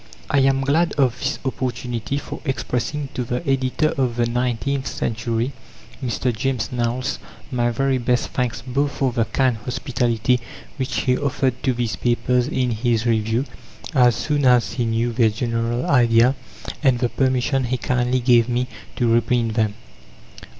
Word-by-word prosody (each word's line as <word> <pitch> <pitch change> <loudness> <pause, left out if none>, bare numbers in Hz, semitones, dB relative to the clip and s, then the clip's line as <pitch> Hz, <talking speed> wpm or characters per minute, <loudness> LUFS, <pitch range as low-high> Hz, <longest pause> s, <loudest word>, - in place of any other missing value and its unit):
I 145 - +4
am 135 0 +3
glad 155 +5 +2
of 130 -4 +1
this 140 0 -1
opportunity 125 -1 -2
for - - -6
expressing 135 0 -2
to 125 - -2
the 125 +6 -4
editor 135 +3 +1
of 125 -3 +1
the 120 -1 +2
Nineteenth 125 +2 -1
Century, 115 +4 -2 0.5
Mr. 125 0 -1
James 125 -1 -1
Knowles, 125 +2 -1 0.3
my 120 -2 +1
very 135 +2 +1
best 125 0 0
thanks, 120 -3 -2
both 140 +3 0
for 135 -2 0
the 115 -2 +1
kind 125 +1 +1
hospitality 120 0 0 0.4
which 130 -1 -1
he 125 - +2
offered 130 -2 -1
to 130 - +1
these 120 -2 -2
papers 120 +1 +1
in 130 -4 0
his 115 0 0
review, 115 +2 +1 0.5
as 125 -4 +5
soon 145 -1 -1
as 125 -2 +4
he 120 - -1
knew 115 +1 0
their 115 -1 +4
general 115 +2 -1
idea, 120 -1 +4 0.5
and 135 -5 +3
the 120 0 0
permission 130 +1 +1
he 130 +2 -1
kindly 125 0 0
gave 120 -1 +4
me 125 +1 +1 0.3
to 120 - +1
reprint 115 0 +2
them. 110 -2 0
125 Hz, 155 wpm, -22 LUFS, 115-130 Hz, 0.5 s, as